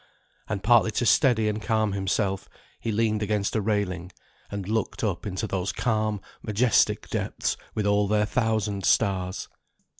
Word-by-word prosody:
And 100 -3 -3
partly 120 -1 +5
to 120 - 0
steady 115 -3 +4
and 105 0 -1
calm 110 -2 +1
himself, 95 0 -1 0.3
he 115 - -2
leaned 110 0 +1
against 105 -1 0
a 110 - +2
railing, 95 -4 -1 0.4
and 100 -2 -5
looked 110 +2 -2
up 105 -1 -1
into 95 +2 -3
those 95 -1 -2
calm 110 -4 0 0.2
majestic 110 +1 +2
depths - - -1 0.2
with 105 - -1
all 100 0 +3
their 105 0 +2
thousand 110 -4 0
stars. 95 0 +1
105 Hz, 150 wpm, -26 LUFS, 100-110 Hz, 0.4 s, partly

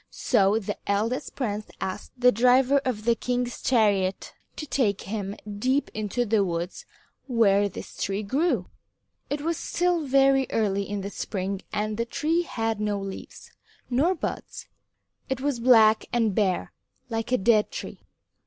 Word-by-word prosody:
So 200 +2 +2
the 205 -2 -4
eldest 225 +7 -1
prince 215 -5 -3
asked 185 - -5
the 250 0 +5
driver 255 +4 +4
of 220 -5 -3
the 235 - +4
king's 245 +1 -2
chariot 205 -6 +1 0.2
to 305 - -5
take 230 -9 0
him 200 -1 -4 0.2
deep 260 +5 +1
into 215 +3 -1
the 215 -2 +2
woods 175 0 -4 0.4
where 205 -5 +3
this - - -9
tree 200 +2 -2
grew. 260 - 0 0.6
It 290 0 -2
was 330 +1 -1
still 355 -1 0
very 270 0 +4
early 200 -3 0
in 205 -1 -3
the 200 +1 -5
spring 195 -1 -3
and 210 0 -2
the 230 - 0
tree 310 +8 0
had 225 -9 -2
no 205 -1 0
leaves, 195 -1 -8 0.4
nor 310 +10 +2
buds. - - -5 0.6
It 265 -1 -1
was 275 -2 -1
black 225 -3 +5
and 230 -4 +1
bare 190 -3 0 0.4
like 225 +2 -2
a 255 - +4
dead 210 +1 +3
tree. - - -7
225 Hz, 155 wpm, -26 LUFS, 200-255 Hz, 0.6 s, the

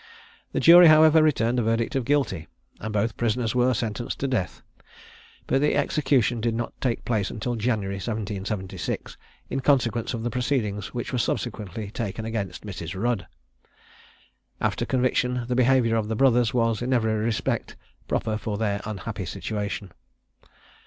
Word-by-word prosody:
The - - -1
jury, 175 +1 +9
however, 155 0 +7
returned 125 -5 +2
a - - +2
verdict 115 +2 0
of 130 -3 0
guilty, 135 - 0 0.3
and 110 - -5
both 105 +2 -1
prisoners 115 -1 0
were 125 0 +3
sentenced 115 +2 -3
to 140 - +1
death; 120 -9 -2 0.8
but 135 - +1
the 150 - +2
execution 125 -6 +1
did 115 0 0
not 120 +1 -3
take 125 -3 -1
place 105 -5 0
until 120 +3 -3
January 105 -4 -1
1776, 100 -2 -4 0.4
in 135 - -1
consequence 120 -4 +1
of 115 - -5
the 120 - -2
proceedings 120 -6 -1
which 120 +1 -5
were 125 - +1
subsequently 105 -4 -3
taken 110 -2 -4
against 105 -4 -4
Mrs. 95 -2 -6
Rudd. 120 -2 -1 1.3
After - - -1
conviction 125 -1 +1
the 125 - -1
behaviour 125 -2 +3
of 110 -2 0
the 110 - -2
brothers 120 -2 +3
was, 115 -3 +1
in 125 +2 0
every 110 -3 +2
respect, 110 +1 -1 0.3
proper 110 -1 -1
for 105 0 -3
their 100 -2 -1
unhappy 105 -5 -5
situation. 105 -2 -4
115 Hz, 150 wpm, -25 LUFS, 105-125 Hz, 1.3 s, jury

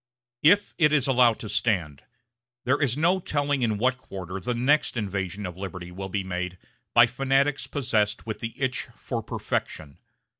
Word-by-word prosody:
If 200 +7 +4
it 150 -3 +5
is 145 -4 +3
allowed 125 -4 +4
to - - -6
stand, 90 -11 0 0.6
there 130 +4 +1
is 135 -2 +1
no 175 +5 +3
telling 145 -5 -1
in 110 -3 +1
what 125 +3 +1
quarter 95 -5 -7
the 120 +5 -2
next 130 +2 +2
invasion 100 -2 -3
of 90 -1 -6
liberty 95 -2 -6
will 95 +2 -6
be 100 0 -2
made 90 -1 -4 0.4
by 120 0 +9
fanatics 135 +4 +1
possessed 110 -7 0
with 110 -1 -4
the 115 0 -6
itch 130 -2 -1
for - - -4
perfection. 70 -2 -4
115 Hz, 165 wpm, -26 LUFS, 95-135 Hz, 0.6 s, by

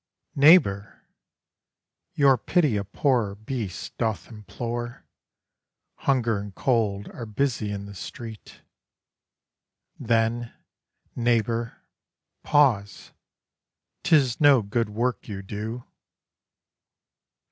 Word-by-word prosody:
Neighbour! 140 - +4 1.1
your 140 -2 +5
pity 150 - +1
a 100 - -1
poor 105 0 0
beast 110 -3 -6
doth 110 -3 -2
implore; 120 +2 -6 0.9
Hunger 120 -6 +1
and 100 -1 -8
cold 105 -6 0
are 115 - -8
busy 115 -1 -1
in 100 0 -5
the 100 - -10
street. 110 +2 -9 1.4
Then, 115 0 0 0.6
neighbour! 115 -1 0 0.6
pause; 125 -10 +1 0.9
'tis 135 -6 +2
no 140 -5 +6
good 110 +2 -1
work 120 +4 -2
you 100 -3 -6
do. 110 +5 -6
115 Hz, 85 wpm, -25 LUFS, 105-125 Hz, 1.4 s, no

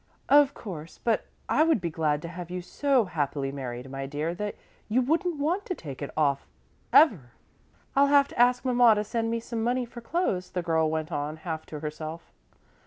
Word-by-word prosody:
"Of 285 -1 +6
course, 165 -7 -8
but 230 -2 +1 0.2
I - - +2
would 320 -5 +4
be 170 -2 -3
glad 150 -2 0
to - - -4
have 175 0 -7
you 180 0 -4
so 270 +3 +2
happily 145 -5 -2
married, 130 -2 -6
my 135 0 -4
dear, 150 +4 -2
that 205 +3 -4 0.3
you 230 +4 +3
wouldn't 325 +6 +1
want 335 +8 0
to 365 - -2
take 140 - -9
it 140 - -4
off 140 -3 +1 0.4
ever." 165 - +5 0.6
"I'll 280 +1 +5
have 280 0 +5
to - - -9
ask 250 +1 +4
Mamma 245 -3 +5
to 210 - 0
send 225 +2 -2
me 230 0 0
some 230 -1 -4
money 245 +1 +1
for 240 0 -10
clothes," 230 - -1
the 180 - -3
girl 160 -2 +2
went 160 +1 -3
on, 150 +1 -3
half 160 -1 -5
to 150 -2 -7
herself. 155 +2 -6
180 Hz, 200 wpm, -27 LUFS, 155-250 Hz, 0.6 s, Of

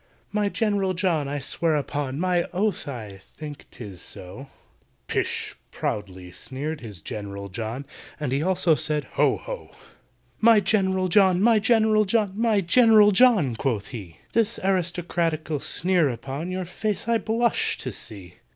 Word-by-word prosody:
"My 205 -1 +1
GENERAL 200 -4 0
JOHN, 170 -6 0
I 145 +1 -2
swear 155 +3 -1
upon 145 -1 -2
My 180 -1 +1
oath 200 -2 -1
I 110 -8 -7
think 150 +6 -10
'tis 100 -7 -8
so—" 120 +10 -7 0.6
"Pish!" - - -1 0.2
proudly 95 -3 -4
sneered 145 +10 -5
his 105 -8 -7
GENERAL 100 +1 -6
JOHN, 115 +7 -5 0.3
And 150 -4 -2
he 135 +2 +1
also 180 -1 +3
said 150 -1 -1
"Ho! - - +3
ho!" - - -7 0.7
"My 225 -1 +6
GENERAL 190 -2 +1
JOHN! 190 -1 +4
my 225 -1 +5
GENERAL 220 -1 +3
JOHN! 210 -1 +1
My 220 -1 +2
GENERAL 215 +2 +6
JOHN!" 195 - +4
quoth 115 -7 -1
he, 95 -9 -8 0.2
"This 230 0 +1
aristocratical 170 -4 0
sneer 175 0 +1
upon 135 +7 -5
Your 185 0 -3
face 210 +4 -3
I 230 -1 +3
blush 230 +2 +1
to - - -4
see! 95 -5 -7
170 Hz, 145 wpm, -25 LUFS, 130-205 Hz, 0.7 s, My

